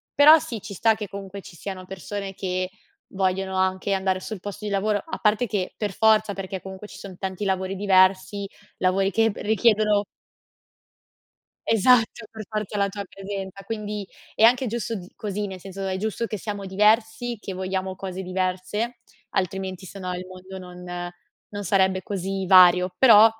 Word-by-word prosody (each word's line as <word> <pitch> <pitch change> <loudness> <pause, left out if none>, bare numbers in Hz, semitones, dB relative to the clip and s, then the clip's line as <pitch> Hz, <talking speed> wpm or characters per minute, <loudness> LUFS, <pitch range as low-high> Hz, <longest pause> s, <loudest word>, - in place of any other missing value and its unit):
Però 300 +3 +9
sì, 230 -7 -5
ci 205 0 -8
sta 225 +4 +3
che 210 -1 -5
comunque 195 0 -7
ci 180 - -13
siano 185 +1 -6
persone 195 +1 -6
che 185 -1 -2 0.4
vogliono 190 0 0
anche 190 +1 +1
andare 190 -1 +1
sul 215 0 -6
posto 205 +1 -6
di 205 - -2
lavoro, 205 +1 +1
a 325 - -5
parte 215 +3 +2
che 190 -3 -2
per 205 -3 -2
forza, 215 0 +4
perché 190 -1 -5
comunque 190 +2 -9
ci - - -12
son 190 -3 -9
tanti 190 +1 -4
lavori 190 0 -1
diversi, 195 0 +3 0.3
lavori 190 +1 +2
che 225 +1 +3
p - - -12
richiedono 210 -1 +3 1.6
Esatto, 225 +1 +4
per 220 -1 -8
forza 215 -1 -3
la 200 0 +2
tua 200 +1 -5
presenza, 195 0 -6
quindi 210 -1 -4 0.3
è - - -1
anche 245 +3 +6
giusto 230 0 -2
d 180 -3 -8
così, 210 0 -3
nel 190 -2 -7
senso 195 +1 -6
è 190 0 -1
giusto 220 +3 -2
che 215 - -4
siamo 205 -1 -5
diversi, 220 +4 +2
che 195 - -6
vogliamo 190 0 -3
cose 190 0 -5
diverse, 185 +6 -2 0.3
altrimenti 190 0 -2
se 195 - -9
no 185 -1 -3
il 180 +1 -6
mondo 185 +1 -10
non 180 -1 -7 0.4
non 205 -1 -5
sarebbe 190 0 +2
così 195 0 -3
vario, 180 -1 +7
però 225 -4 +9
195 Hz, 170 wpm, -24 LUFS, 185-210 Hz, 1.6 s, Però